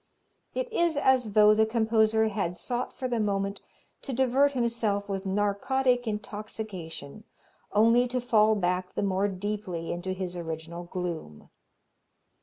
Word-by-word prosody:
"It - - -1
is 340 -7 +2
as 255 -6 +3
though 210 0 +7
the 220 +1 +3
composer 220 -1 +2
had 195 -4 -2
sought 245 0 -3
for 255 - -4
the 240 -2 -1
moment 200 -1 -1 0.4
to 275 - -2
divert 265 +3 +3
himself 230 -5 0
with 195 -1 -3
narcotic 245 +6 +1
intoxication 210 - -6 0.5
only 230 +4 +4
to 250 +1 -1
fall 220 -3 +4
back 180 -1 -1
the - - 0
more 195 0 +1
deeply 195 -3 -4
into 180 +2 -3
his 185 -1 -5
original 165 0 -6
gloom." 170 - -6
210 Hz, 135 wpm, -28 LUFS, 185-235 Hz, 0.5 s, though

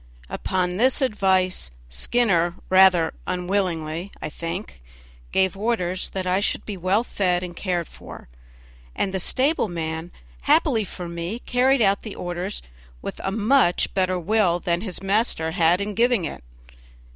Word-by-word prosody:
Upon 180 -1 -1
this 255 +4 +3
advice 190 - +1 0.2
Skinner, 175 - +1 0.2
rather 185 -3 +5
unwillingly, 180 -2 -2
I - - -4
think, 165 - -6 0.5
gave 190 0 +2
orders 195 -4 -1
that 190 -1 -4
I 185 +1 +2
should 205 - -1
be 210 - -5
well 190 +5 +1
fed 180 -6 0
and 175 -1 -7
cared 175 -3 -2
for, - - -12 0.7
and 195 - -1
the 190 - 0
stable 265 - +2
man, 165 -1 -4 0.3
happily 220 - +3
for 180 -1 -7
me, 170 +5 -4
carried 250 +1 +2
out 195 -1 +3
the 215 - -7
orders 175 +3 -4 0.4
with - - -6
a - - 0
much 220 -2 +2
better 185 -1 +1
will 180 -1 +2
than 170 0 -1
his 195 -3 -4
master 195 -5 +1
had 170 0 +3
in 205 +1 -3
giving 235 -2 +2
them. - - -5
185 Hz, 145 wpm, -23 LUFS, 175-210 Hz, 0.7 s, rather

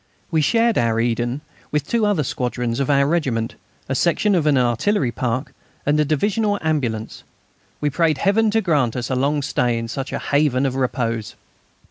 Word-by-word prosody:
We 160 -2 +2
shared 230 +8 +2
our 115 -1 +1
Eden 120 +3 -1 0.3
with 150 -1 -1
two 230 -3 +1
other 195 -7 +1
squadrons 125 -2 -2
of 140 - -1
our 140 -1 +4
regiment, 135 -8 0 0.3
a 135 - -1
section 175 +9 +2
of 165 -5 +2
an 145 -2 +4
artillery 125 - +1
park, 125 +2 -3 0.3
and 150 +1 +2
a - - +4
divisional 205 +8 +1
ambulance. 120 -9 -2 0.6
We 145 -1 +1
prayed 160 0 +2
Heaven 215 +7 +2
to 225 +1 +2
grant 145 - +1
us 125 0 -3
a - - +1
long 140 +3 0
stay 125 -4 0
in 115 0 -3
such 135 +3 -5
a - - -2
haven 140 -2 +1
of 130 -1 -1
repose. 115 -4 -2
140 Hz, 180 wpm, -21 LUFS, 120-160 Hz, 0.6 s, our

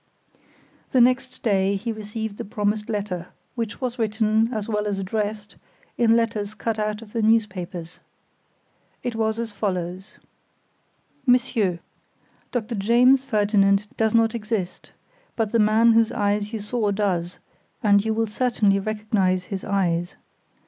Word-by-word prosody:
The 260 - +5
next 255 +1 +2
day, 200 -2 +2
he 220 +4 -3
received 215 0 -5
the - - -4
promised 210 0 -2
letter, 200 -5 -3 0.3
which 230 -3 -4
was 250 -1 -3
written, 220 +1 +1
as 215 -4 -3
well 210 -1 -1
as 200 -1 -1
addressed, 210 +2 -3 0.4
in 230 -1 +4
letters 215 -2 -1
cut 220 0 -2
out 210 +1 -2
of 210 - -16
the 230 - 0
newspapers. 185 -6 0 1.0
It 245 - -2
was 220 0 0
as 230 -1 -3
follows: 185 -2 -4 1.1
"MONSIEUR: 230 -8 +2 0.7
Doctor 240 -1 -2
James 240 +6 +4
Ferdinand 205 -4 +2
does 220 0 +1
not 225 0 +4
exist, 210 -5 -4 0.5
but 220 -3 -1
the 230 - +2
man 220 +2 +5
whose 225 0 +4
eyes 205 -1 0
you 225 - -3
saw 210 +1 -1
does, 185 -4 -1 0.5
and 200 -1 +5
you 220 - -1
will 225 0 +1
certainly 210 -3 +1
recognize 205 -3 0
his 190 - -4
eyes. 175 -3 0
215 Hz, 140 wpm, -23 LUFS, 200-230 Hz, 1.1 s, The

